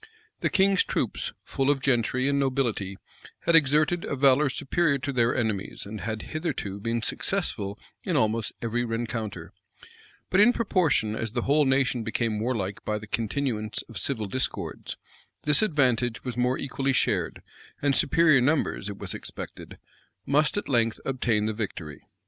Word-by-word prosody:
The - - +1
king's 195 -1 +4
troops, - - -2
full 135 0 -1
of 145 -1 +3
gentry 130 0 +1
and 140 0 +2
nobility, 120 -8 -1 0.4
had 170 - +3
exerted 155 +3 +4
a - - -2
valor 140 +1 +4
superior 140 +3 +1
to 140 +1 -4
their 120 -2 +2
enemies, 110 -6 -2
and 105 0 -7
had 110 +2 -4
hitherto 150 - -4
been 115 +2 -2
successful 100 -2 -1 0.3
in - - -1
almost 110 0 +1
every 120 +1 0
rencounter; 115 -2 -4 0.8
but 190 - +4
in 240 +4 +7
proportion 170 - +1
as 110 -1 -3
the 120 -2 -1
whole 145 +2 +3
nation 130 -2 +2
became 110 -1 -1
warlike 105 -4 -2
by 105 - -1
the 110 - -8
continuance 110 -1 -2
of 115 - -8
civil 115 -6 -1
discords, 130 +6 -3 0.5
this 150 -1 +4
advantage 125 - +1
was 125 -3 -4
more 125 +1 +1
equally 135 0 -1
shared; - - 0 0.4
and 140 -1 +2
superior 155 -3 +4
numbers, 130 -7 +1
it 100 - -6
was - - -4
expected, - - -8 0.5
must 150 +6 +2
at 205 - -2
length 115 -4 +1
obtain 120 -5 +1
the 110 - 0
victory.. 90 - -5
125 Hz, 155 wpm, -26 LUFS, 110-140 Hz, 0.8 s, in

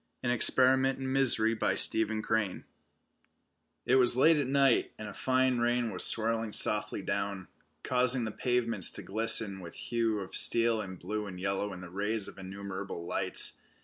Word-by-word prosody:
AN 120 - 0
EXPERIMENT 130 +2 +4
IN 130 -1 -5
MISERY 120 -4 +2 2.3
It 130 - +2
was 125 -1 +5
late 160 +4 +4
at 145 -3 -1
night, 135 -2 +1
and 110 - -8
a 105 - -9
fine 130 +2 0
rain 120 -1 0
was 90 - +1
swirling 115 -1 +2
softly - - +1
down, 100 -2 -4 0.4
causing 125 0 +1
the 110 - -4
pavements 115 -6 0
to - - -7
glisten 110 -1 -1
with 85 -2 -11
hue 115 -2 -2
of 95 -2 -7
steel 115 -1 +3
and 95 -2 -9
blue 105 +3 -5
and 90 -2 -9
yellow 100 +2 -3
in 90 -1 -9
the 90 -1 -11
rays 105 +2 -2
of - - -9
the 95 - -13
innumerable 95 -2 -7
lights. 95 +1 -1
110 Hz, 160 wpm, -29 LUFS, 100-125 Hz, 2.3 s, was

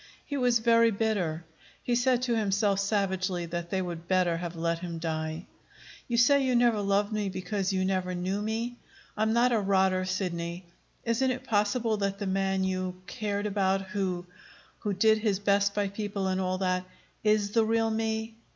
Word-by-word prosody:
He 285 - -4
was 250 -3 +3
very 230 0 +4
bitter. 195 -7 -1 0.4
He 245 - 0
said 245 0 +2
to 240 -2 +1
himself 200 -2 +1
savagely 190 -3 0
that 170 0 -4
they 190 0 0
would 170 -1 -6
better 180 -2 +2
have 170 0 -5
let 165 0 -1
him 170 -1 -5
die. 160 0 -3 0.6
"You 235 - 0
say 275 +4 +5
you 255 -1 +1
never 240 -3 +3
loved 200 +1 +1
me 210 -2 -1
because 190 +1 -2
you 185 -1 0
never 185 -1 -1
knew 185 +3 -2
me. 230 +3 -3 0.4
I'm 220 +1 +1
not 240 +2 +3
a 230 - +3
rotter, 190 -2 +2
Sidney. 180 -2 -3 0.4
Isn't 235 +3 +1
it 255 0 -2
possible 215 +1 +1
that 200 -1 -1
the 200 - -4
man 190 0 0
you, 185 -1 -2
cared 205 0 -3
about, 195 -1 +1
who 185 -3 -2 0.5
who 210 - -2
did 220 +3 +4
his 210 -3 +1
best 200 0 +2
by 205 -1 +1
people 200 -1 -3
and 190 0 0
all 185 0 -1
that 185 -1 0 0.4
is 210 -1 +2
the 225 +1 +3
real 225 0 +1
me?" 220 0 -2
200 Hz, 180 wpm, -28 LUFS, 185-220 Hz, 0.6 s, say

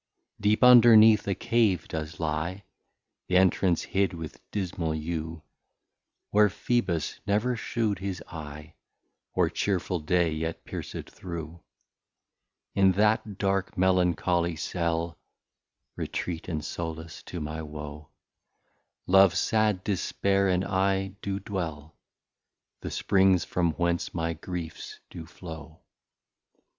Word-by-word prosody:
Deep 105 +4 +2
underneath 115 -4 +8
a 100 - +1
Cave 105 -8 +1
does 80 0 -5
lie, 80 +5 -2 0.7
Th'entrance 90 -1 +3
hid 95 -1 0
with 80 -3 -8
dismal 90 -5 -2
Yew, 80 0 -4 0.9
Where 105 0 +5
Phebus 95 -5 -1
never 110 +5 +1
shew'd 110 -3 -1
his 95 -1 -4
Eye, 75 -2 -9 0.6
Or - - +3
cheerful 90 -2 -1
Day 85 +1 +1
yet 80 +1 -4
pierced - - -6
through. 85 -2 -7 1.1
In 95 -1 +4
that 105 0 +1
dark 95 0 -1
Melancholy 90 -2 +2
Cell, 85 +1 -2 0.8
(Retreate 85 -2 -4
and 80 -4 -3
Sollace 80 -1 -6
to 90 - -6
my 80 +1 -4
Woe) 75 0 -8 1.0
Love, 95 -1 +5
sad 110 -4 +1
Dispair, 100 0 +1
and 90 +1 +1
I, 95 0 +1
do 100 -1 -3
dwell, 80 -6 -5 0.8
The - - -5
Springs 95 -2 +3
from 85 -2 0
whence 85 +1 -1
my 85 0 -1
Griefs 85 0 -7
do 80 -2 -8
flow. 80 -3 -10
90 Hz, 110 wpm, -27 LUFS, 80-100 Hz, 1.1 s, underneath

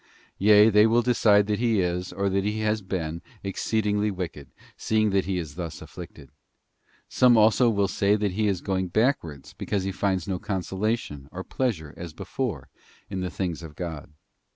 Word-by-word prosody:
Yea, 105 +2 +6
they 105 +1 +6
will 120 +2 +3
decide 105 -4 +4
that 105 0 -1
he 115 -3 +2
is, 90 0 -1
or 100 +2 -1
that 95 0 +1
he 105 +2 -2
has 110 0 0
been, 85 -4 -4 0.2
exceed 105 +2 -1
ingly 105 0 +1
wicked, 85 -8 -6 0.3
seeing 110 -1 +1
that 95 -1 +1
he 95 0 -1
is 80 -5 -5
thus 85 -2 -6
afflicted. - - -11 0.8
Some 125 -2 +4
also 110 +3 +5
will 100 -3 +1
say 100 +2 +2
that 105 -2 0
he 105 +3 0
is 95 -4 0
going 95 -2 -1
backwards, 85 - -1
because 100 -2 -2
he 95 - -2
finds 95 -2 -1
no 95 -2 -2
consola 95 +4 -1
tion 70 -9 -10
or 95 +1 -6
pleasure, 95 - -2
as 85 -2 -7
before, 95 - -4 0.4
in 95 - -3
the 90 - -2
things 85 -3 -3
of 80 -3 -10
God. 80 -5 -6
95 Hz, 185 wpm, -26 LUFS, 90-105 Hz, 0.8 s, Yea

